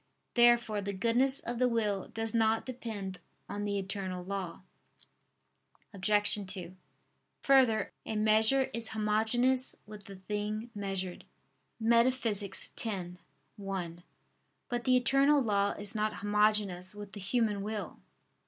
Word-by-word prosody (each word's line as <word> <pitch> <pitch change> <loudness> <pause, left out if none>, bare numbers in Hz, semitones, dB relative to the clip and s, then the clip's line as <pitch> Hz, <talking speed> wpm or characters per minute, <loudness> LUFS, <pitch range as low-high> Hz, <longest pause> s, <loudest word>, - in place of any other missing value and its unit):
Therefore 240 -3 +4
the 200 0 -4
goodness 240 +7 +2
of 240 0 -5
the 250 - +4
will 210 -4 -1
does 225 0 -4
not 225 -1 +2
depend 220 -7 -6 0.3
on 205 0 -4
the 200 -1 -1
eternal 190 -2 -4
law. 190 -3 -5 1.3
Obj. 205 0 +3
2: 185 -2 -7 0.7
Further, 255 -6 +3
"a 220 - -5
measure 220 +5 +3
is 230 0 -2
homogeneous 225 +4 +2
with 210 -1 -11
the 200 - -10
thing 210 +4 -4
measured" 195 -3 -4 0.6
(Metaph. 230 -1 +2
x, 195 -1 -2 0.8
1). 180 -4 -5 0.7
But 240 -1 -3
the 255 0 +5
eternal 275 +4 +4
law 205 -5 +1
is 205 +1 -1
not 215 -1 -1
homogeneous 205 -2 +1
with 205 -1 -9
the 205 - -8
human 210 0 0
will. 210 +1 -5
210 Hz, 125 wpm, -31 LUFS, 200-235 Hz, 1.3 s, the